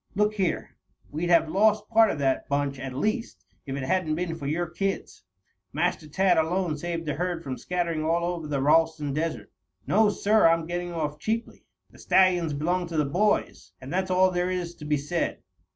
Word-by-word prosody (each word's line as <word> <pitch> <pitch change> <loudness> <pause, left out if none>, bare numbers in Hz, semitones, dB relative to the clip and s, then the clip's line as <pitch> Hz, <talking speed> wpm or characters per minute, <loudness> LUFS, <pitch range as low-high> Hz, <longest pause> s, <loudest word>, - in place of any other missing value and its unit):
Look 210 +1 +2
here! 190 -5 -2 0.4
We'd 165 +4 -2
have 170 -2 +5
lost 210 +4 +2
part 225 -1 +5
of - - -2
that 135 -2 0
bunch, 140 -1 -1
at 135 +1 -5
least, 215 - -2 0.2
if 135 - -3
it 140 - -4
hadn't 160 +1 0
been 175 0 -2
for 140 -4 -6
your 165 +4 0
kids. 195 - -4 0.5
Master 165 0 -1
Tad 180 +2 +2
alone 170 0 0
saved 170 +2 -4
the 150 - -1
herd 175 +1 -3
from 135 -4 -4
scattering 170 0 -2
all 170 +2 +1
over 175 -3 -3
the 140 -2 -1
Ralston 150 -1 +2
Desert. 160 +2 -3 0.3
No, 215 +1 +4
sir, 210 -1 +3
I'm 165 0 +2
getting 175 +1 -4
off 150 -3 -3
cheaply. 225 +7 -3 0.3
The - - -18
stallions 180 -4 +3
belong 175 +5 -1
to 165 -1 -4
the 150 - +2
boys, 175 - 0
and 130 +4 -8
that's 185 +1 0
all 185 0 +4
there 180 0 0
is 180 -2 -3
to 150 - -9
be 150 0 +1
said. 155 +5 -3
170 Hz, 195 wpm, -26 LUFS, 150-185 Hz, 0.5 s, have